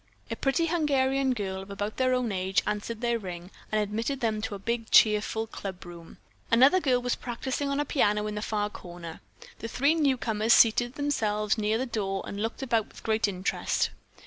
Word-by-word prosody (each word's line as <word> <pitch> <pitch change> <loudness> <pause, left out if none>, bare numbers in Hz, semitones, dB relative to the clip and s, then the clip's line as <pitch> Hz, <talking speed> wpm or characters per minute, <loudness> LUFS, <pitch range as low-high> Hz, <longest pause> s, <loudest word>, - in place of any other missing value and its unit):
A - - -1
pretty 280 +5 +1
Hungarian 275 -5 +1
girl 190 -3 -3
of 195 - -11
about 205 +2 -4
their 255 0 +2
own 250 -3 -1
age 190 0 0
answered 215 +2 -3
their 235 -1 +1
ring 180 -2 -8 0.2
and 215 - +2
admitted 225 +6 -2
them 220 -3 -1
to 210 - -4
a - - -5
big 230 +3 -3
cheerful 215 +1 +4
clubroom. 175 -5 -9 0.3
Another 265 +10 +6
girl 260 -7 +2
was 245 - 0
practicing 260 +3 -3
on 280 0 -1
a 295 - 0
piano 210 -7 +1
in 210 0 -4
a 210 - -3
far 210 -1 -1
corner. 175 -3 -9 0.4
The 230 - -5
three 280 +6 +2
newcomers 240 -8 +2
seated 240 +2 +4
themselves 215 -8 0
near 215 0 0
the 255 - -1
door 195 -5 -2
and 200 - -5
looked 225 +4 -3
about 230 -4 +1
with - - -15
great 220 -1 +1
interest. 185 -1 -1
220 Hz, 190 wpm, -28 LUFS, 205-255 Hz, 0.4 s, Another